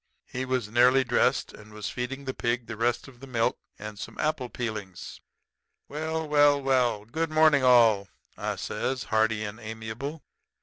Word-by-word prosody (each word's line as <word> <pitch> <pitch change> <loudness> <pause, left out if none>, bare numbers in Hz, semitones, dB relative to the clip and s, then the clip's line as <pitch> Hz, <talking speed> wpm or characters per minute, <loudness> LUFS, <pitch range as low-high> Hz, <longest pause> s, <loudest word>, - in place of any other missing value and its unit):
He 130 +1 -4
was 130 -4 -1
nearly 125 +3 +5
dressed, 125 -1 +1
and 105 0 -14
was 105 -1 -5
feeding 135 +3 -5
the 130 - -3
pig 120 0 -1
the 115 - -6
rest 120 +3 0
of 125 -3 -15
the 135 - -11
milk 115 -3 0 0.2
and 105 0 -8
some - - -8
apple 150 -5 -1
peelings. 105 -7 -6 0.7
"'Well, 160 +2 -3
well, 145 -1 +5
well, 125 -6 +1
good 160 +8 -2
morning 155 -3 +4
all,' 115 -6 +5 0.3
I - - -3
says, 130 -3 -3
hearty 110 0 +1
and 105 +2 -6
amiable. 110 +7 -6
125 Hz, 165 wpm, -27 LUFS, 110-135 Hz, 0.7 s, nearly